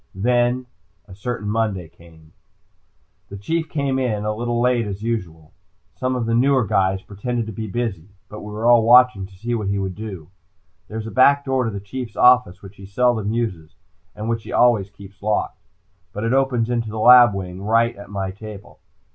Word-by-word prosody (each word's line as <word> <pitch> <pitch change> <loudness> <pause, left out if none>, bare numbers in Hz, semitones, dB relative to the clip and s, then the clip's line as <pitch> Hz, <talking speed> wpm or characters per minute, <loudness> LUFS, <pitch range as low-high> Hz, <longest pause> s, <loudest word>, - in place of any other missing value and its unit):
Then 120 +4 +1 0.4
a 95 - -12
certain 105 +2 -5
Monday 105 -5 -1
came. 80 -1 -20 1.0
The 100 - -8
Chief 160 +11 -2
came 140 -3 -1
in, 110 -5 -1
a 105 - 0
little 120 +2 -2
late 120 -2 +1
as 100 +1 -6
usual. 85 -9 -4 0.4
Some 130 0 -2
of 120 -2 -2
the 115 - -1
newer 130 +1 +3
guys 95 -1 0
pretended 115 +3 -4
to 110 - -6
be 110 +1 -6
busy, 105 -5 -4 0.2
but 105 - -9
we 105 - -8
were 110 +2 -4
all 120 -1 +6
watching 120 -4 +5
to 95 - -18
see 115 +6 -4
what 110 -4 -2
he 100 0 -1
would 95 -1 -3
do. 95 -5 -8 0.6
There 110 - -7
is 110 - -5
a 110 - -6
back 140 +2 +4
door 130 -2 0
to - - -1
the 100 -2 -5
Chief's 115 +3 -7
office 125 -8 +4
which 100 +1 -13
he 100 - -11
seldom 110 0 +1
uses 95 -10 -4 0.4
and 105 +1 -6
which 115 0 -1
he - - -10
always 110 -5 +3
keeps 100 0 -15
locked. 105 +1 -2 0.5
But 105 - -5
it 115 +2 0
opens 125 -3 +1
into 115 -2 -1
the 110 - -6
lab 120 -1 +7
wing 90 -1 -6
right 115 +3 +2
at 100 -1 -12
my 95 -2 -3
table. 105 0 -11
110 Hz, 200 wpm, -21 LUFS, 100-120 Hz, 1.0 s, lab